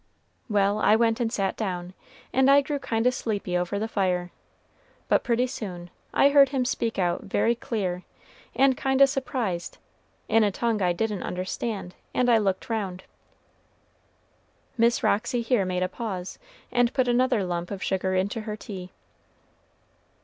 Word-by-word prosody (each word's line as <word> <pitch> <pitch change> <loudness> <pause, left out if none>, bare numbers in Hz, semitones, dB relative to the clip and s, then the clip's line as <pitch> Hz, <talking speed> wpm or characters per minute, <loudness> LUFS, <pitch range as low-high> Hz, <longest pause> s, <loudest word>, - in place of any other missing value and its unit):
Well, 205 0 +2
I 215 - +5
went 225 +1 +2
and 230 -2 0
sat 195 -5 -1
down, 180 -4 -4 0.4
and 265 +1 +4
I 280 +1 +7
grew 285 +1 -3
kind 225 -3 -1
o' 250 - +5
sleepy 205 -7 -3
over 180 +3 -1
the 215 +2 -2
fire; 180 -4 -1 0.8
but - - +3
pretty 245 0 +2
soon 180 -9 -7 0.2
I 280 - +5
heard 280 -1 +6
him 260 -2 0
speak 235 -2 -1
out 175 -2 0
very 230 +4 +2
clear, 195 -7 -3 0.5
and 270 -1 +4
kind 265 0 0
o' - - +10
surprised, 250 -10 -3 0.5
in 225 0 +4
a 210 - +3
tongue 220 +2 -1
I 180 -1 +3
didn't 210 +2 -2
understand, 185 +1 -4 0.2
and 245 -1 +3
I 230 - +5
looked 195 -3 -1
round." 195 -5 -3 1.7
Miss 235 0 +2
Roxy 235 +3 +1
here 230 -4 +2
made 185 0 -1
a - - +1
pause, 190 -2 -5 0.3
and 245 -1 +3
put 260 -2 +2
another 245 -3 +2
lump 175 -1 -3
of 200 -2 -5
sugar 190 0 0
into 200 +4 -1
her 215 -1 -5
tea. 185 -4 -8
215 Hz, 160 wpm, -26 LUFS, 185-245 Hz, 1.7 s, o